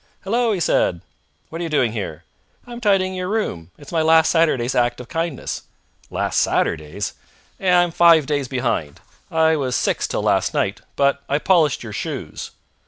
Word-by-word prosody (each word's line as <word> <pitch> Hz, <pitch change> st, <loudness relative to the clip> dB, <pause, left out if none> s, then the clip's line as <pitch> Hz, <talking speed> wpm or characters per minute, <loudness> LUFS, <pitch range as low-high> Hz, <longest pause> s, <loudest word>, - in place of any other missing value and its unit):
"Hallo!" 230 Hz, +3 st, +1 dB
he 200 Hz, -, -1 dB
said. 85 Hz, -, +1 dB, 0.5 s
"What 165 Hz, +1 st, -6 dB
are -, -, -1 dB
you 165 Hz, -, -3 dB
doing 135 Hz, -7 st, +2 dB
here?" 100 Hz, -8 st, -5 dB, 0.4 s
"I'm 240 Hz, 0 st, -9 dB
tidying 195 Hz, -3 st, +2 dB
your 185 Hz, -1 st, -3 dB
room. 145 Hz, -, -2 dB
It's 145 Hz, -, -13 dB
my 165 Hz, -2 st, +1 dB
last 160 Hz, 0 st, +5 dB
Saturday's 145 Hz, -7 st, +2 dB
act 120 Hz, -1 st, +1 dB
of 125 Hz, -, -9 dB
kindness." 165 Hz, -4 st, -3 dB, 0.5 s
"Last -, -, 0 dB
Saturday's?" 75 Hz, -2 st, -1 dB, 0.5 s
"I'm 180 Hz, -2 st, +3 dB
five 165 Hz, -3 st, +5 dB
days 145 Hz, -2 st, -1 dB
behind. 120 Hz, -, -2 dB, 0.3 s
I 160 Hz, 0 st, +3 dB
was 130 Hz, -4 st, -1 dB
six -, -, 0 dB
till -, -, -2 dB
last -, -, +1 dB
night, -, -, -1 dB
but 140 Hz, 0 st, +2 dB
I 140 Hz, -, +2 dB
polished 155 Hz, -5 st, +2 dB
your 110 Hz, -3 st, -7 dB
shoes." -, -, -5 dB
160 Hz, 170 wpm, -21 LUFS, 125-175 Hz, 0.5 s, last